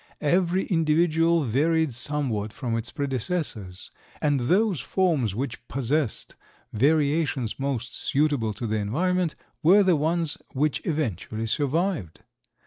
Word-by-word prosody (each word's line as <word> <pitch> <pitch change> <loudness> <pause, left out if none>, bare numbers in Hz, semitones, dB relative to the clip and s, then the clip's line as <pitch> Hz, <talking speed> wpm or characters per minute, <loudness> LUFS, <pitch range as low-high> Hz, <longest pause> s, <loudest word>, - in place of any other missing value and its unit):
Every 180 +4 +2
individual 165 0 +2
varied 155 +4 +1
somewhat 120 -5 -2
from 120 -4 -3
its 115 +1 -3
predecessors, 130 - -3 0.3
and 145 -2 +1
those 185 - +2
forms 140 - 0
which 120 -1 -4
possessed 135 0 -2 0.4
variations 145 -1 +1
most 130 -3 -3
suitable 135 -7 0
to 120 - -5
the 110 -1 -1
environment 170 - 0 0.3
were 195 +6 +6
the 185 -3 +4
ones 160 +1 -1
which 145 +3 0
eventually 115 - -2
survived. 145 - -1
145 Hz, 115 wpm, -25 LUFS, 120-165 Hz, 0.4 s, were